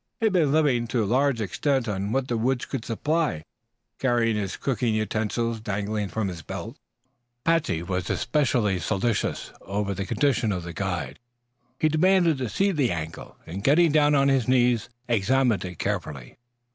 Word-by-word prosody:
He 225 - 0
had 215 - +2
been 160 -6 +3
living, 140 -6 +2
to 115 0 0
a - - -1
large 130 +2 +2
extent, 125 +6 0
on 100 0 -2
what 130 +1 0
the 120 - -1
woods 125 +3 0
could 135 -5 -4
supply, 130 - -1 0.6
carrying 120 -3 +2
his 100 -3 -3
cooking 120 -4 0
utensils 110 +2 -1
dangling 105 0 -2
from 110 +1 -2
his 90 -3 -6
belt. - - -7 0.7
Patsey 165 - +1
was 90 -1 -3
especially 120 -7 +1
solicitous 105 +4 -1
over 100 +1 -2
the 95 +1 -4
condition 130 -6 +1
of 90 -3 -3
the 85 0 -7
guide. 90 0 -3 0.6
He 155 - +3
demanded 170 -1 +3
to 125 -3 -2
see 195 - +1
the 145 - +1
ankle, 80 -2 -6
and 95 +4 -6
getting 160 +5 +5
down 150 -1 +4
on 140 0 +4
his 135 -4 +2
knees 125 -2 +2 0.2
examined 120 +1 +2
it 90 -2 -7
carefully. 70 - -4
115 Hz, 170 wpm, -25 LUFS, 100-140 Hz, 0.7 s, getting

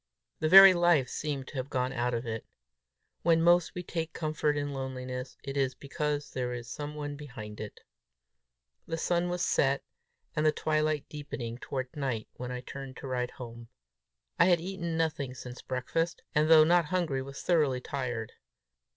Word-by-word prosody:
The 155 - +1
very 195 +1 +11
life 175 -7 +3
seemed 140 -3 -3
to - - -8
have 130 +1 -3
gone 130 -1 -1
out 125 -1 0
of 115 +2 -3
it. 115 -1 -4 0.8
When 165 -1 +4
most 175 +2 +4
we 180 - -4
take 165 -2 -4
comfort 155 -2 0
in 145 0 -2
loneliness, 130 -1 -5
it 135 0 -5
is 135 -2 +1
because 145 +1 -3
there 125 -1 -2
is 120 -1 -6
some 150 +3 -6
one 145 -1 -4
behind 115 -8 -9
it. 110 - -8 1.1
The 165 - -2
sun 175 +1 +1
was 180 0 0
set 135 0 +2 0.5
and 150 - +1
the 155 - +5
twilight 155 -1 0
deepening 130 -5 -6
toward 130 -1 -4
night 130 -7 -2
when 125 0 -6
I 125 0 -4
turned 135 0 -8
to - - -7
ride 125 -1 -1
home. 120 -1 -9 0.7
I 170 - +7
had 175 -2 +5
eaten 170 -2 -3
nothing 145 -5 -1
since 125 +1 -8
breakfast, 140 +7 -2
and 155 0 +3
though 160 -1 +9
not 170 +1 +4
hungry, 160 -5 0
was 135 +1 -8
thoroughly 150 -7 +2
tired. 120 -4 -4
145 Hz, 175 wpm, -30 LUFS, 125-160 Hz, 1.1 s, very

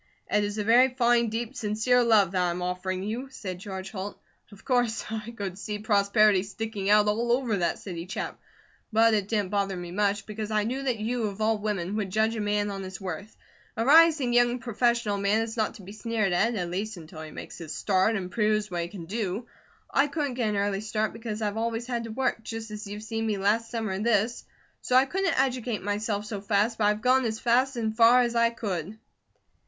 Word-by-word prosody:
"It 210 0 +3
is 205 +1 -3
a 210 - 0
very 245 +4 +5
fine, 235 -2 +3
deep, 230 +3 -4
sincere 225 +3 +2
love 215 -6 +4
that 185 -1 +1
I 180 - +2
am 175 +1 -3
offering 185 +1 -2
you," 235 +6 -4
said 185 -9 -6
George 190 -1 -6
Holt. 200 0 -6 0.3
"Of 200 - -15
course 245 -4 +1
I 220 0 -4
could 200 -5 -6
see 210 +1 -4
prosperity 205 -1 +3
sticking 205 0 -4
out 210 0 +5
all 230 +3 +1
over 240 -4 +1
that 175 -2 0
city 175 -3 -7
chap, - - -5 0.5
but 225 +1 +5
it 205 -3 +1
didn't 205 -4 -1
bother 200 -2 0
me 175 -1 -6
much, 205 +1 0
because 215 0 -5
I 215 -1 +1
knew 255 +5 -2
that 255 -4 -1
you, 225 +2 -1
of 200 0 -7
all 220 0 +1
women, 205 -2 -2
would 205 -3 -2
judge 220 +3 +1
a 220 - -2
man 205 0 0
on 195 -1 -5
his 190 +1 -7
worth. 190 +2 -6 0.4
A 225 - 0
rising 305 -3 +6
young 240 0 +4
professional 235 -3 0
man 205 +3 +2
is 225 0 -6
not 220 -2 -1
to 200 - -12
be 190 - -10
sneered 215 -3 -1
at, 225 +7 +2
at 175 -4 -3
least 205 +3 -3
until 160 -1 -10
he 155 - -7
makes - - -9
his 160 -2 -6
start 195 +3 +2
and 185 -3 -4
proves 215 -1 +1
what 175 -1 -1
he 170 - -3
can 175 -2 -9
do. 205 +3 -3 0.4
I 275 +2 +2
couldn't 285 -2 -2
get 240 -3 0
an 210 - -1
early 200 0 0
start, 215 0 -1
because 225 -1 -5
I've 205 0 -1
always 230 +1 -2
had 240 -2 -3
to 225 - -6
work, 260 0 -1
just 225 0 -6
as 210 0 -6
you've 205 +1 -7
seen 225 0 -3
me 210 -2 0
last 215 +4 +1
summer 225 -4 -3
and 190 +2 -2
this, 230 0 +1 0.4
so 250 - 0
I 260 +1 +7
couldn't 365 +1 0
educate 250 -5 0
myself 205 +1 -2
so 210 -2 -5
fast, 210 +3 +1
but 210 - +3
I've 210 +1 +2
gone 260 +1 +4
as 220 -1 -2
fast 255 +3 +2
and 220 -2 -2
far 235 +2 +6
as 240 -1 0
I 235 0 +4
could." 205 -4 -4
215 Hz, 225 wpm, -27 LUFS, 200-235 Hz, 0.5 s, I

